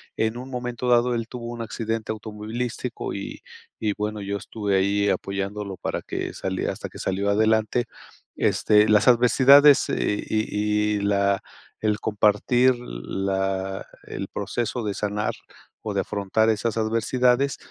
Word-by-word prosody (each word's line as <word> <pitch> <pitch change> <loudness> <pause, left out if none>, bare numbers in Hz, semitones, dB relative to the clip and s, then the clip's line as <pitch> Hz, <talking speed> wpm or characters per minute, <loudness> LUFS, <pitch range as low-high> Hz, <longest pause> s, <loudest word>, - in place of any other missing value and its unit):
en 110 +1 0
un 130 +2 -7
momento 125 -1 -4
dado, 120 0 +4
él 115 -1 -3
tuvo 120 -1 -7
un 120 0 -6
accidente 115 -1 -3
automovilístico 110 +3 -5
y 100 - -6 0.4
y 105 - +2
bueno, 105 +1 -3
yo 100 0 -3
estuve 100 -1 -2
ahí 100 +1 +2
apoyándolo 100 0 -3
para - - -3
que - - -4
salie 95 -1 -2
hasta - - -5
que - - -13
salió 100 +2 -1
adelante. 110 +3 +2 0.5
Este, 105 0 +3
las 105 +3 +5
adversidades 135 +4 +6
y 105 0 0
y 100 - -1
la 100 -1 +2 0.4
el 105 -1 +1
compartir 110 +5 +3
la 95 - -3 0.2
el 95 - -6
proceso 115 +3 -3
de 105 - -1
sanar 105 +1 -2 0.5
o 105 - -4
de 100 - +1
afrontar 105 +2 0
esas 110 +1 0
adversidades, 125 +4 +1
105 Hz, 140 wpm, -24 LUFS, 100-120 Hz, 0.5 s, adversidades